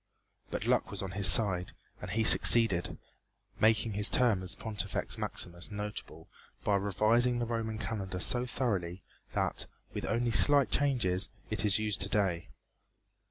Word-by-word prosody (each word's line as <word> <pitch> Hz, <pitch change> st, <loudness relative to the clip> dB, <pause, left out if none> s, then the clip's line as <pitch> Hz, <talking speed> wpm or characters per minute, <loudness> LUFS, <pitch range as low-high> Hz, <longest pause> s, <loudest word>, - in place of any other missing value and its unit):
But -, -, -5 dB
luck -, -, 0 dB
was -, -, -4 dB
on 95 Hz, -, -6 dB
his 95 Hz, +1 st, +1 dB
side 90 Hz, -2 st, +5 dB, 0.3 s
and -, -, -8 dB
he 110 Hz, +1 st, -1 dB
succeeded, 110 Hz, -5 st, +4 dB, 0.6 s
making 110 Hz, 0 st, +1 dB
his 105 Hz, +1 st, +3 dB
term 115 Hz, -7 st, +2 dB
as 95 Hz, +1 st, +2 dB
Pontifex 105 Hz, -2 st, -3 dB
Maximus 85 Hz, 0 st, -3 dB
notable 105 Hz, -6 st, -8 dB, 0.4 s
by 105 Hz, -, 0 dB
revising 110 Hz, +5 st, 0 dB
the 120 Hz, -, -2 dB
Roman 115 Hz, -1 st, -4 dB
calendar 95 Hz, -3 st, -6 dB
so 125 Hz, +6 st, 0 dB
thoroughly 95 Hz, -8 st, -4 dB, 0.3 s
that, -, -, -1 dB, 0.3 s
with -, -, -5 dB
only 120 Hz, +1 st, -2 dB
slight 135 Hz, +7 st, +3 dB
changes, 115 Hz, -10 st, 0 dB, 0.2 s
it 110 Hz, -, +2 dB
is 105 Hz, -2 st, +4 dB
used 105 Hz, -2 st, -2 dB
to 95 Hz, -, 0 dB
day. 95 Hz, -6 st, -2 dB
105 Hz, 150 wpm, -30 LUFS, 95-115 Hz, 0.6 s, side